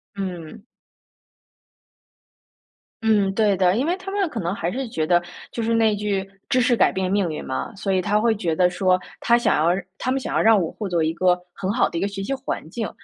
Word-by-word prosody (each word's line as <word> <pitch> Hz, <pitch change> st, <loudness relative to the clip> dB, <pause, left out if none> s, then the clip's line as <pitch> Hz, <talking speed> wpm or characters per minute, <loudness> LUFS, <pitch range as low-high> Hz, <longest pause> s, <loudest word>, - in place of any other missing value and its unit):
嗯。 185 Hz, 0 st, -6 dB, 2.4 s
嗯， 210 Hz, -3 st, +3 dB
对 210 Hz, -2 st, +3 dB
的， 185 Hz, 0 st, +3 dB
因 250 Hz, +5 st, +1 dB
为 345 Hz, +3 st, +1 dB
他 380 Hz, 0 st, -8 dB
们 395 Hz, -1 st, 0 dB
可 285 Hz, -, -5 dB
能 175 Hz, +1 st, -2 dB
还 170 Hz, -2 st, -2 dB
是 260 Hz, +3 st, -3 dB
觉 160 Hz, -7 st, -1 dB
得， 175 Hz, +2 st, +3 dB, 0.3 s
就 235 Hz, -, -4 dB
是 230 Hz, 0 st, +1 dB
那 220 Hz, -2 st, +3 dB
句， 200 Hz, -2 st, -2 dB, 0.2 s
“知 255 Hz, -, +3 dB
识 245 Hz, 0 st, +3 dB
改 -, -, +4 dB
变 190 Hz, -1 st, -2 dB
命 195 Hz, -3 st, +1 dB
运” 155 Hz, -, -6 dB
嘛。 130 Hz, -, -3 dB
所 195 Hz, 0 st, -2 dB
以 185 Hz, -, +2 dB
他 205 Hz, +3 st, +1 dB
会 230 Hz, +1 st, +3 dB
觉 175 Hz, -6 st, -1 dB
得 180 Hz, +1 st, +3 dB
说， 185 Hz, 0 st, +2 dB, 0.2 s
他 235 Hz, -, +4 dB
想 240 Hz, -, +2 dB
要 170 Hz, +4 st, +2 dB, 0.2 s
他 255 Hz, -, -2 dB
们 270 Hz, -, +1 dB
想 -, -, -5 dB
要 -, -, +3 dB
让 225 Hz, -2 st, +5 dB
我 165 Hz, -3 st, -2 dB
获 210 Hz, -3 st, -5 dB
得 170 Hz, -2 st, +1 dB
一 160 Hz, +1 st, 0 dB
个， 180 Hz, +1 st, +2 dB
很 195 Hz, -1 st, -3 dB
好 240 Hz, -, +2 dB
的 -, -, -9 dB
一 -, -, -4 dB
个 200 Hz, -, +1 dB
学 200 Hz, -1 st, -5 dB
习 270 Hz, -, -2 dB
环 265 Hz, -, -4 dB
境， 225 Hz, 0 st, -3 dB
200 Hz, 250 characters per minute, -23 LUFS, 180-230 Hz, 2.4 s, 让